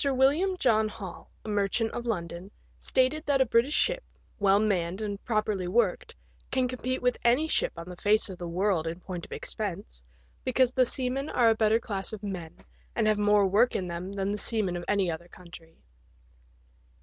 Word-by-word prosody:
William 290 +9 +3
John 220 -8 +3
Hall, 195 -4 -9 0.2
a - - -7
merchant 210 +2 0
of 240 0 -5
London, 175 -3 -3 0.3
stated 265 +4 +1
that 280 -2 +3
a 265 - +5
British 240 +5 +2
ship, - - +1 0.4
well 200 -1 +4
manned 190 -3 0
and 205 -2 -4
properly 215 -5 0
worked, 195 -1 0 0.3
can 260 -1 +1
compete 255 +1 -3
with 250 0 +1
any 250 +7 +3
ship - - 0
on 170 +1 -7
the 180 - -7
face 210 +4 +2
of 190 -3 -8
the 175 - -5
world 175 -1 0
in 165 +2 -4
point 180 -2 -7
of - - -32
expense, 195 - -5 0.4
because 255 -1 +2
the 255 -2 +3
seamen 265 +2 -1
are 230 -2 +4
a - - +2
better 220 0 +3
class 200 -1 -4
of 215 -1 -7
men, 180 -5 -6 0.4
and 225 - +1
have 215 -1 +2
more 205 -1 +4
work 205 +6 +3
in 185 - -1
them 175 +2 -5
than 200 0 -2
the 210 - -3
seamen 210 -6 0
of 175 - -4
any 195 -4 +2
other 165 +2 -7
country. 170 -2 -14
210 Hz, 190 wpm, -28 LUFS, 185-245 Hz, 0.4 s, a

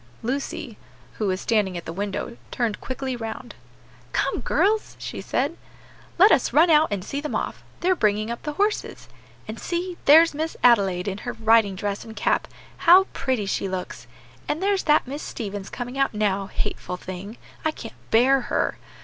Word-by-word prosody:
Lucy, 255 -1 -3 0.4
who 215 - 0
was 185 -1 0
standing 205 -6 +1
at 170 - -7
the 165 - -5
window, 205 +4 -4
turned 230 -4 -2
quickly 260 0 -4
round. 230 +1 -6 0.6
"Come, - - 0
girls," 430 +2 +1
she - - -6
said, 285 +6 -1 0.6
"let 400 +5 +7
us - - +3
run 325 +4 +6
out 310 0 +6
and 200 -2 -3
see 280 +5 -3
them 300 - -4
off; - - -3 0.2
they're 370 +2 +3
bringing 215 - +1
up 235 - -5
the 300 - -4
horses. 410 +6 -1 0.4
And 215 +1 -6
see, 350 0 -3
there's 325 +3 +7
Miss 315 +2 -3
Adelaide 195 -7 +4
in 195 0 -3
her 245 - -5
riding 220 -3 +3
dress 200 +1 -3
and 220 -1 -10
cap; - - +1 0.3
how 360 +3 +7
pretty 260 -6 -1
she 195 0 -1
looks! 180 -10 -6 0.4
And 320 +5 -2
there's 395 -1 +1
that 300 -1 +4
Miss 280 +4 -6
Stevens 205 -4 -6
coming 245 +2 -5
out 275 -5 +1
now; 200 -2 0
hateful 180 -1 -4
thing! 185 +5 -8 0.3
I 315 - +2
can't 230 -7 -8 0.2
bear 260 +4 +4
her! - - 0
235 Hz, 175 wpm, -24 LUFS, 205-300 Hz, 0.6 s, let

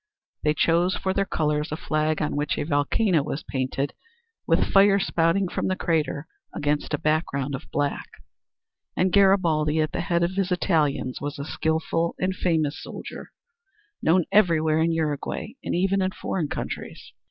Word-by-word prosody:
They 150 0 +1
chose 170 +3 +2
for 190 - -1
their 195 0 0
colors 150 0 -1
a 155 - -2
flag 155 -1 0
on 150 - -2
which 145 0 -1
a - - -1
volcano 160 +4 +2
was 145 +2 -4
painted 135 +1 -2 0.5
with - - +3
fire 195 0 +6
spouting 180 0 +1
from - - -2
the 185 - 0
crater 160 -4 -1 0.3
against 145 +1 0
a - - -4
background 145 -3 -1
of 135 - -6
black. 145 -1 -1 0.9
And 185 0 +2
Garibaldi 170 -6 +3
at 155 0 +1
the - - -2
head 170 -2 +1
of 170 - +1
his 195 -1 0
Italians 150 -8 0
was 145 +2 -4
a 140 - -5
skilful 160 +2 -1
and 185 0 -1
famous 160 -5 0
soldier, - - -8 0.7
known 170 +1 +3
everywhere 160 -6 +3
in 165 +1 +2
Uruguay 160 +6 -2
and - - -2
even 195 +2 +2
in 185 - +1
foreign 180 -3 -3
countries. - - -6
160 Hz, 165 wpm, -25 LUFS, 150-185 Hz, 0.9 s, fire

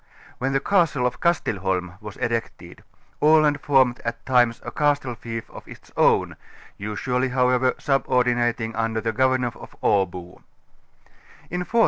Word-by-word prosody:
When 135 +2 -1
the 135 - +2
castle 165 -6 +1
of 125 0 -2
Kastelholm 95 - -1
was 105 -2 -9
erected, 115 -1 -4 0.4
Aland 150 -1 +4
formed. 130 -3 +3
at 115 0 -5
times 125 -2 +3
a - - -5
castle 145 -4 0
fief 115 -1 -7
of - - -12
its - - -14
own, - - +2 0.4
usually 125 +5 -2
however 125 0 +2
subordinating 120 -4 0
un 115 0 -1
der 110 - 0
the 115 0 -1
governor 130 0 +1
of - - -13
Abo. 90 -3 0
125 Hz, 130 wpm, -23 LUFS, 115-130 Hz, 0.4 s, Aland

